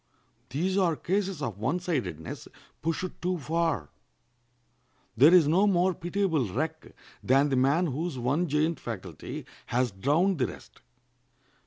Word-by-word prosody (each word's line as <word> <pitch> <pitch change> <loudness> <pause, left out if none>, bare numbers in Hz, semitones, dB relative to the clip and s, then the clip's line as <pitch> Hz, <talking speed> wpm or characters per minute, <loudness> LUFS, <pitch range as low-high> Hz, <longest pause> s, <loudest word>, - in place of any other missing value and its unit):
These 185 +9 0
are 175 -4 +2
cases 190 -2 -2
of 110 -7 -4
one 135 +11 0
sidedness 135 - -4 0.3
pushed 165 +3 -3
too 180 +1 0
far. 160 - -1 1.3
There 140 +8 +7
is 175 -5 +6
no 185 +7 +4
more 185 -1 +3
pitiable 170 - -1
wreck 160 - -4 0.3
than 135 +3 +3
the 135 - +1
man 140 +7 +3
whose 155 0 -3
one 140 +9 0
giant 155 +3 +1
faculty 95 -8 -7 0.2
has 125 0 +1
drowned 150 - +1
the 125 - +2
rest. 90 - -12
155 Hz, 135 wpm, -28 LUFS, 130-175 Hz, 1.3 s, There